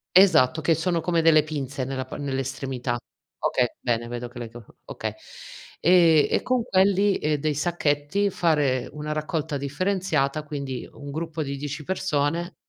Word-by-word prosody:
Esatto 160 -6 +6
che 165 - +3
sono 170 +2 0
come 170 0 +1
delle 155 -2 +6
pinze 140 -3 -4
nella 130 0 -3
pa - - -8
nell'estremità. 135 -2 -3 0.4
Okay, 125 - +2
bene, 115 -1 -1
vedo 120 0 -5
che 120 0 -11
le 115 -1 -6
co 120 -2 -12 0.2
okay. - - -4 0.7
Ehm, 165 -3 +5
e - - +1
con 250 -2 0
quelli 195 -1 +3
e 150 -1 0
dei 150 +1 -1
sacchetti 155 +4 0
fare 145 -8 +1
una 150 +1 -5
raccolta 155 -1 -2
differenziata, 155 -1 -1
quindi 140 -4 -5
un 145 -1 -9
gruppo 160 0 -3
di 140 0 -4
10 145 +2 -5
persone 170 -1 -1
150 Hz, 155 wpm, -25 LUFS, 135-170 Hz, 0.7 s, Esatto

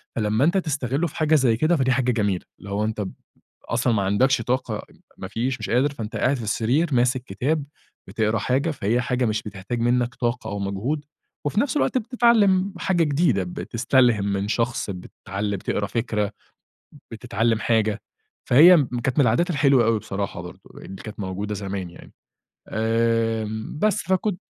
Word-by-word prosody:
فلمّا 110 +4 +1
أنتَ 175 +4 +2
تستغله 145 -2 -1
في - - -12
حاجة 155 -1 +2
زي 125 -6 +3
كده 155 +6 +2
فدي 130 -4 +1
حاجة 125 0 +2
جميلة. 100 -5 -1
اللي 100 - -10
هو 100 +2 -1
أنتَ 110 -1 -3
ب 95 - -5 0.6
أصلًا 120 0 +1
ما 100 -2 +1
عندكش 115 +6 +2
طاقة، 120 -3 -2 0.3
ما 95 - -6
فيش 125 +5 -2
مش - - -5
قادر، 135 +4 +2
فأنتَ 110 -4 -6
قاعد 135 +2 +2
في 115 - -6
السرير 125 +9 0
ماسك 125 +1 +2
كتاب، 140 +9 -1 0.4
بتقرأ 110 0 0
حاجة، 135 +8 0
فهي 120 -2 0
حاجة 125 -1 0
مش 110 -1 0
بتحتاج 105 +3 -5
منّك 120 0 +1
طاقة 120 0 -2
أو 100 - -4
مجهود، 110 +10 -2 0.4
وفي 200 +9 0
نفس 290 +1 -1
الوقت 265 - +1
بتتعلم 215 -5 +3
حاجة 175 -3 +1
جديدة، 140 - +2
بتستلهم 115 +3 +1
من 100 +1 -1
شخص، 115 0 -1
بتعل 100 +2 -5
بتقرا 100 +2 -2
فكرة، 105 -3 -1 0.8
بتتعلم 115 +1 0
حاجة. 110 -1 +1 0.5
فهي 165 +9 +8
م 145 - +3
كانت 130 +4 -1
من 140 - +6
العادات 125 +10 +2
الحلوة 140 -6 +3
أوي 115 -1 +2
بصراحة 100 -3 -4
برضو، 90 0 -12
اللي 95 0 -10
كانت 110 -1 -9
موجودة 100 +2 -4
زمان 95 -2 -4
يعني. 85 - -15 0.6
آمم، 115 +1 -1
بس 215 -3 +2
فكنت 185 +1 0
120 Hz, 170 wpm, -23 LUFS, 105-140 Hz, 0.8 s, فهي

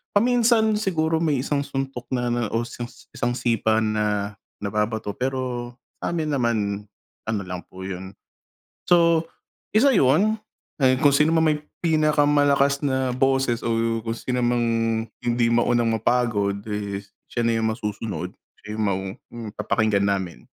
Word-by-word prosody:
paminsan 230 -1 +4
siguro 160 -5 +1
may 150 -6 +1
isang 145 0 0
suntok 135 -3 -4
na 120 -1 -1
na 120 0 0
o 115 - +1 0.5
isang 120 0 -1
sipa 110 -2 +1
na 105 -1 -1 0.2
nababato 105 +1 -1
pero 125 0 -3 0.2
sa'min 160 -3 -2
naman, 105 -6 0 0.4
ano 110 -2 -1
lang 90 -1 -7
po 95 0 -10
'yun. 95 0 -6 0.7
So, 170 -2 +4 0.5
isa 275 +5 +6
'yun, 205 - +3 0.4
ayun 130 -1 +5
kung 145 0 +4
sino 150 +2 +4
man 160 0 +3
may 150 -1 +1 0.2
pinaka-malakas 145 -2 +3
na 130 -3 0
boses 135 -2 +1
o 115 -1 0
kung 115 0 -3
sino 125 -1 -2
mang 120 0 +2 0.6
hindi 120 0 +1
maunang 120 0 +2
mapagod, 110 -3 +1
eh, 105 -2 -3 0.3
siya 120 -1 0
na 115 - +2
'yung 110 0 +1
masusunod. 105 -1 -4 0.3
Siya 105 - -8
'yung 110 - -2
mau 100 -2 +1 0.5
papakinggan 105 -1 +1
namin. 95 -4 -1
120 Hz, 135 wpm, -24 LUFS, 110-145 Hz, 0.7 s, isa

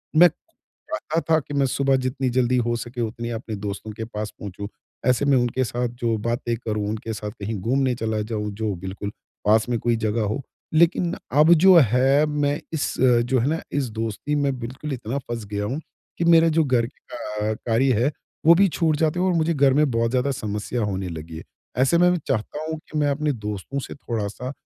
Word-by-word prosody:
मैं 175 +3 +8
खुद 315 - -10
चाहता 160 +2 -1
था 160 - +6
कि 145 0 -9
मैं 140 -1 +2
सुबह 135 +1 +2
जितनी 130 0 -1
जल्दी 125 0 +2
हो 120 - +1
सके 120 +1 -5
उतनी 115 +1 -3
अपने 115 -1 -4
दोस्तों 100 +2 -5
के 110 +1 -5
पास 105 -1 -5
पहुँचूँ। 100 0 -6 0.4
ऐसे 125 +2 +3
मैं 140 -2 +4
उनके 120 +1 +1
साथ 120 +1 -1 0.2
जो 115 -2 +2
बातें 120 +2 -1
करूँ, 105 -3 -3
उनके 110 +1 -4
साथ 105 0 -5
कहीं 105 +2 -3
घूमने 130 +3 +1
चला 110 -2 -1
जाऊँ 105 -1 -3
जो 105 0 -2
बिल्कुल 95 +3 -5 0.4
पास 110 +3 +4
में 120 - +1
कोई 120 +1 +1
जगह 110 0 -1
हो। 110 +7 -2 0.3
लेकिन 170 +2 +3 0.2
अब 150 +5 +6
जो 185 +3 +7 0.2
है 135 +4 +4
मैं 145 0 0
इस 155 - -1
जो 125 0 +3
है 120 - +1
ना 160 - -1
इस 140 -3 0
दोस्ती 115 +6 -3
में 140 -2 0
बिल्कुल 130 +5 -5
इतना 125 +2 -3
फँस 120 -4 -5
गया 105 0 -1
हूँ 130 +8 -2 0.4
कि - - 0
मेरे 165 -1 +6
जो 160 - +5
घर 125 -5 +2
के - - -20
का 105 -2 -2
कार्य 120 +4 +1
है 145 - +2 0.3
वो 165 - +9
भी 195 +2 +5
छूट 160 -2 +1
जाते 160 +2 +1
हैं 185 - +2
और 185 - +2
मुझे 165 0 +2
घर 140 -3 +4
में 150 +1 +3
बहुत 115 0 +1
ज़्यादा 130 +2 +1
समस्या 110 -1 -3
होने 95 -2 -2
लगी 80 0 -7
है। - - -8 0.3
ऐसे 135 +6 +4
में 175 +1 +5
मैं 180 - +2
चाहता 130 +6 -2
हूँ 160 - -3
कि 155 - -3
मैं 145 - +2
अपने 150 +1 0
दोस्तों 105 +3 -4
से - - -7
थोड़ा-सा 115 0 -4
125 Hz, 215 wpm, -23 LUFS, 110-145 Hz, 0.4 s, वो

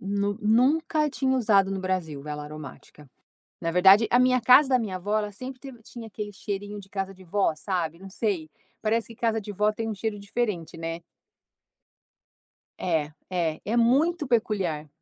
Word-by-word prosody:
Nu 200 +1 -1
nunca 300 +8 +3
tinha 265 +1 0
usado 200 -5 +3
no 195 -1 -2
Brasil 180 -6 -2
vela 150 0 -5
aromática. 150 -1 -11 0.5
Na 165 -1 -1
verdade, 195 +5 +6
a 245 - +5
minha 255 0 +4
casa 255 +4 +7
da 255 -1 +4
minha 210 -5 -3
avó 205 +4 -1
ela 210 -1 -3
sempre 255 +5 -8
teve 250 -2 -11
tinha 230 0 -9
aquele 210 -1 -6
cheirinho 205 +1 -5
de 195 -1 -14
casa 195 -1 -4
de 190 0 -16
vó, 190 -1 +1
sabe, 170 -1 -3
não 195 +1 -10
sei, 190 -6 -2 0.3
parece 225 +1 0
que 230 - -11
casa 225 -1 +1
de 205 - -7
vó 210 +2 +2
tem 225 +1 -4
um - - -2
cheiro 210 +1 -3
diferente, 200 -5 -3
né. 165 +1 -5 1.8
É, 155 -4 -1 0.2
é, 170 -4 -1
é 220 +3 -1
muito 290 +8 +3
peculiar. 195 -10 0
205 Hz, 175 wpm, -26 LUFS, 180-230 Hz, 1.8 s, casa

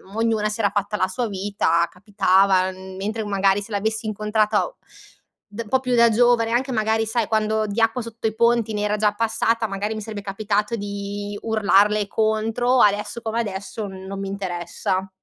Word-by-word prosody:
ognuna 225 -2 +1
si 215 +2 -4
era 205 - +3
fatta 205 +1 -2
la 185 -2 +1
sua 235 +5 -2
vita, 190 -4 +1
capitava 190 -1 +2
mentre 190 +4 -5
magari 200 0 +2
se 215 - -10
l'avessi 220 +2 -1
incontrata 215 - 0 0.7
d 210 +2 -7
un 220 - -17
po' 260 - +3
più 255 -2 -1
da 235 0 +6
giovane 235 0 +3
anche 255 +3 0
magari 220 0 +1
sai 225 -1 0
quando 215 0 +1
di 210 +3 -2
acqua 225 +2 +2
sotto 230 0 -4
i 220 - -3
ponti 235 -1 +2
ne 205 - -2
era 210 0 0
già 210 -1 +2
passata, 225 +1 0
magari 205 +2 -3
mi 215 - -5
sarebbe 210 -1 -6
capitato 205 +2 -1
di 205 0 -5
urlarle 210 -1 +3
contro, 225 +4 +1
adesso 210 +3 +1
come 225 0 -2
adesso 205 0 -4
n 190 -1 -9
non 195 0 -6
mi 195 - -4
interessa. 190 0 -3
210 Hz, 180 wpm, -22 LUFS, 200-225 Hz, 0.7 s, da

